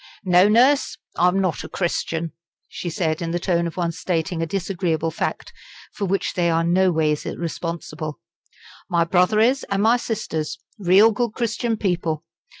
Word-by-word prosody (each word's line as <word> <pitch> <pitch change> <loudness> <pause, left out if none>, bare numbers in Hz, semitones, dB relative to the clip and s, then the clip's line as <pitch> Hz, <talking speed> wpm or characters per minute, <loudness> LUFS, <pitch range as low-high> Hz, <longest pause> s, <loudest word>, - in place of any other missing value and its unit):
"No, 180 +2 +5
Nurse, 250 +2 +4 0.2
I'm 180 +2 +3
not 185 -5 -1
a - - -8
Christian," 165 -2 -2 0.4
she 175 - -5
said 160 -1 -1
in 170 - -2
the 175 +1 -1
tone 170 -1 0
of 165 - -8
one 170 -2 0
stating 165 0 -2
a 165 - -1
disagreeable 170 -3 -1
fact - - -4 0.4
for 200 - -3
which 195 +1 -1
they 175 -1 +1
are 165 0 +2
noways 165 -4 +2
responsible. 165 -2 -5 0.7
"My 170 -2 +3
brother 180 +5 +3
is 250 +5 +3
and 200 0 +1
my 230 +3 +5
sisters 160 -10 -3 0.2
real 200 +4 +6
good 235 +1 -1
Christian 230 0 -1
people. 170 -6 -1
175 Hz, 155 wpm, -22 LUFS, 165-200 Hz, 0.7 s, real